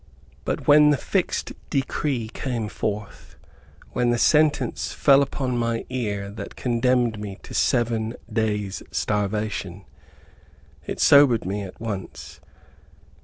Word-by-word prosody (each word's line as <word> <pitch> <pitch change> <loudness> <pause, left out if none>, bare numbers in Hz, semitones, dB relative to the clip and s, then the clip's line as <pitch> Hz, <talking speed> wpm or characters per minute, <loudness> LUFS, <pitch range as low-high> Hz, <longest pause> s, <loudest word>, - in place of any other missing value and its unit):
But - - -3
when 150 0 +7
the 145 - +3
fixed - - -1 0.2
decree 135 -3 -1
came 115 -3 -3
forth, 105 -1 -5 0.6
when 125 -1 +1
the 120 - +2
sentence 150 +4 +2
fell 140 -1 +5
upon 130 -3 -1
my 115 -1 -1
ear 100 -6 -3
that 100 -1 -8
condemned 120 -2 +1
me 100 -2 -6
to - - -10
SEVEN 115 -2 +1 0.2
DAYS' 105 -3 -1
STARVATION, 105 -2 -2 1.0
it - - -4
sobered 140 -7 +6
me 100 +2 -2
at 95 -2 -9
once. 105 -4 -6
115 Hz, 120 wpm, -24 LUFS, 105-130 Hz, 1.0 s, when